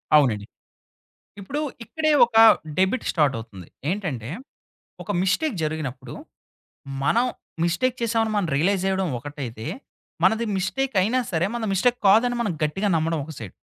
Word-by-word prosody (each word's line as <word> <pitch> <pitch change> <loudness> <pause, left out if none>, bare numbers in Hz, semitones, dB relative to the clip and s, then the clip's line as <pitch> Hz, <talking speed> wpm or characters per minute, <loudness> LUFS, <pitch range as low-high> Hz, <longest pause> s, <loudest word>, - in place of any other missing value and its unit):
అవునండి. 115 -9 +3 0.9
ఇప్పుడు 275 +10 -4 0.2
ఇక్కడే 310 +5 0
ఒక 235 -1 -14 0.4
డెబిట్ 190 +7 +1
స్టార్టవుతుంది. 115 - -1 0.2
ఏంటంటే, 160 - -3 0.7
ఒక - - -8
మిస్టేక్ 215 +6 0
జరిగినప్పుడు. 150 -5 -4 0.9
మనం 235 - +3 0.4
మిస్టేక్ 235 +10 +1
చేసామని 225 -1 +1
మనం 200 -4 +1
రియలైజ్ 185 +6 +1
జేయడం 190 -1 0
ఒకటైితే. 130 -5 -7 0.6
మనది 230 +1 +3
మిస్టేక్ 255 +7 -2
అయినా 225 +7 +1
సరే 170 +1 +1
మనది 225 -3 -2
మిస్టేక్ 245 +6 +2
కాదని 230 +5 +5
మనం 210 -6 0
గట్టిగా 190 +7 0
నమ్మడం 165 0 0
ఒక 160 - -9
సైడ్. 105 -5 -8
190 Hz, 125 wpm, -24 LUFS, 150-230 Hz, 0.9 s, కాదని